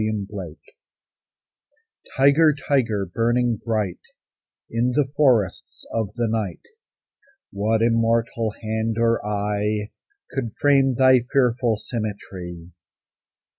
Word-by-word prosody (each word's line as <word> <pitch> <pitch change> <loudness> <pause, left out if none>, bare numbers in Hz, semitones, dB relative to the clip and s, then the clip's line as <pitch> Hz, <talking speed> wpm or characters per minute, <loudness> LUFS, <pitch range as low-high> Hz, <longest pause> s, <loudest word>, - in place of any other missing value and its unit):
THE 110 0 0 0.2
TIGER 90 -6 -7 1.6
Tiger, 140 +3 +5
tiger, 115 -8 +1
burning 120 +4 0
bright 105 -5 -1 0.7
In 120 +2 0
the 140 -3 +1
forests 120 -11 +1
of 110 -2 0
the 120 -1 0
night, 110 -5 -3 0.9
What 110 +2 0
immortal 115 -1 +1
hand 110 +1 -2
or 115 0 +2
eye 105 0 -2 0.4
Could 120 -5 -4
frame 135 -2 +3
thy 130 0 +6
fearful 125 -4 +2
symmetry? 95 -6 -6
115 Hz, 95 wpm, -23 LUFS, 105-125 Hz, 1.6 s, thy